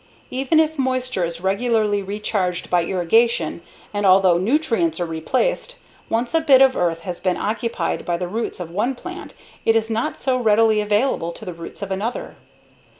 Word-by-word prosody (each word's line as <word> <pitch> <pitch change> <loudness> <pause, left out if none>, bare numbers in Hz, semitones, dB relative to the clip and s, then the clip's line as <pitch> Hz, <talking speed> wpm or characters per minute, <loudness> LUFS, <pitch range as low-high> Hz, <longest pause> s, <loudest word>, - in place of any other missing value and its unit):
Even 270 +5 +2
if 315 -1 +1
moisture 255 -6 0
is 170 0 -3
regularly 210 +1 +1
recharged 195 -2 -2
by 175 -1 +3
irrigation, 180 0 +1 0.3
and 205 0 -1
although 185 -2 +5
nutrients 295 - +1
are 175 - 0
replaced, 170 - -1 0.3
once 235 +2 -1
a 325 - +3
bit 280 -5 +6
of 265 -1 +5
earth 165 -2 0
has 175 +1 -5
been 185 -1 0
occupied 215 -5 -2
by 175 -1 -1
the 180 0 -3
roots 225 +3 -4
of 170 -2 -6
one 230 +9 -1
plant 360 +7 -9 0.3
it 225 - +3
is 225 0 +1
not 225 +2 -2
so 260 -1 +1
readily 220 -1 +3
available 210 -4 0
to 220 - -11
the 180 - -5
roots 170 +4 -9
of 195 - -6
another. 210 +6 -3
210 Hz, 175 wpm, -21 LUFS, 180-250 Hz, 0.3 s, bit